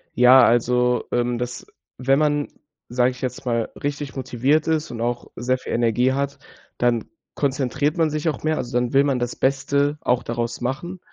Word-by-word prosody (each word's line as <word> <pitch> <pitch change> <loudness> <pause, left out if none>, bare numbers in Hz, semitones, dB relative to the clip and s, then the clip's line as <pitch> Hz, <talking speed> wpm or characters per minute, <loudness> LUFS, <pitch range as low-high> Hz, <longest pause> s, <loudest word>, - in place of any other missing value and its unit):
Ja, 125 +2 +7
also, 125 +1 +3
ähm, 120 0 0
dass 125 0 -5 0.3
wenn 135 +2 +2
man, 145 -1 +1 0.4
sage 125 +1 +2
ich 125 - -12
jetzt 125 0 -4
mal, 115 -2 0
richtig 145 -1 -4
motiviert 135 +4 +1
ist 160 -1 0
und 115 -1 -6
auch 120 0 -2
sehr 130 +2 0
viel - - -6
Energie 120 +2 +2
hat, 140 0 -2 0.4
dann 120 -2 +1 0.3
konzentriert 140 +2 0
man 160 -2 +3
sich 155 +2 -3
auch 150 - -5
mehr. 155 0 +1
Also, 125 0 -5
dann 125 +1 -1
will 140 +1 +5
man 135 -3 0
das 120 0 -3
Beste 140 +2 +1
auch 125 0 +1
daraus 120 0 -3
machen. 170 +9 -4
130 Hz, 185 wpm, -22 LUFS, 120-145 Hz, 0.4 s, Ja